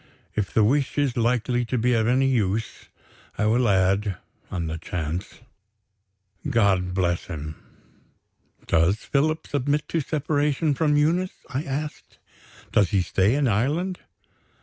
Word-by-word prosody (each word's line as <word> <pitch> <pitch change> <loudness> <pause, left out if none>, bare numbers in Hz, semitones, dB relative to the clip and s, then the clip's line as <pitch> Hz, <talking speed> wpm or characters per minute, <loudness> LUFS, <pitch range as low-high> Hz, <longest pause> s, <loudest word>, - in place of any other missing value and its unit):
If 105 -3 -2
the 110 - +3
wish 135 +7 +1
is 140 -4 +1
likely 120 +1 +1
to 125 +2 -1
be 125 +2 +2
of 110 -1 +2
any 130 +2 +3
use, 110 -4 -1 0.5
I 105 - +1
will 115 +2 +3
add 95 0 +2 0.3
(on 85 -2 -3
the 80 +1 -4
chance) 85 +5 -5 1.1
God 95 -7 +2
bless 90 -2 0
him." 75 -1 -6 1.1
"Does 85 +4 +3
Philip 150 +7 0
submit 145 +1 -1
to 165 - 0
separation 150 0 0
from 150 +1 +2
Eunice?" 175 +5 0
I 135 +1 -1
asked. 150 +2 -5 0.5
"Does 100 -4 +3
he 95 0 +2
stay 95 +6 +2
in 145 -2 +2
Ireland?" 150 - 0
120 Hz, 135 wpm, -24 LUFS, 95-145 Hz, 1.1 s, the